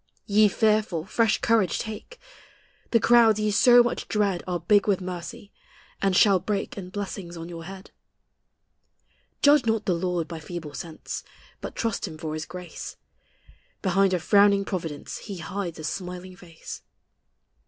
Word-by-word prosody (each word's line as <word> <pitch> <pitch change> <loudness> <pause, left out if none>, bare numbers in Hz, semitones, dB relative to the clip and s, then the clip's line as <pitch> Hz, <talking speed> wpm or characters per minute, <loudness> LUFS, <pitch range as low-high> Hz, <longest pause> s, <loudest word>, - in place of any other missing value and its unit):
Ye 210 +1 +5
fearful, 210 -5 +1
fresh 225 -2 +2
courage 225 -6 +2
take! 220 - -7 0.7
The 230 - +4
clouds 225 -1 +5
ye 215 0 +1
so 245 +3 +7
much 240 - -3
dread 200 -4 0
Are 180 -1 -1
big 200 +5 +3
with 195 -2 +2
mercy, 180 +2 -7 0.5
and 195 -1 +2
shall 195 -1 +5
break 200 +2 -3
In 185 -3 -7
blessings 185 -3 -6
on 165 0 -7
your 165 -1 -8
head. 190 +1 -10 1.5
Judge 290 -4 +5
not 225 -1 +1
the 185 - +2
Lord 175 -1 -1
by 165 +1 -7
feeble 160 -2 -7
sense. 160 +1 -6 0.4
But - - -7
trust 230 -3 -2
Him 155 - -9
for 155 -1 -5
His 155 0 -5
grace: 180 -2 -8 0.9
Behind 195 0 +3
a - - -1
frowning 200 +2 +4
providence 165 -7 -5
He 200 -3 -7
hides 175 +1 -5
a 155 - -8
smiling 180 +2 -5
face. 170 -2 -10
190 Hz, 155 wpm, -25 LUFS, 175-210 Hz, 1.5 s, so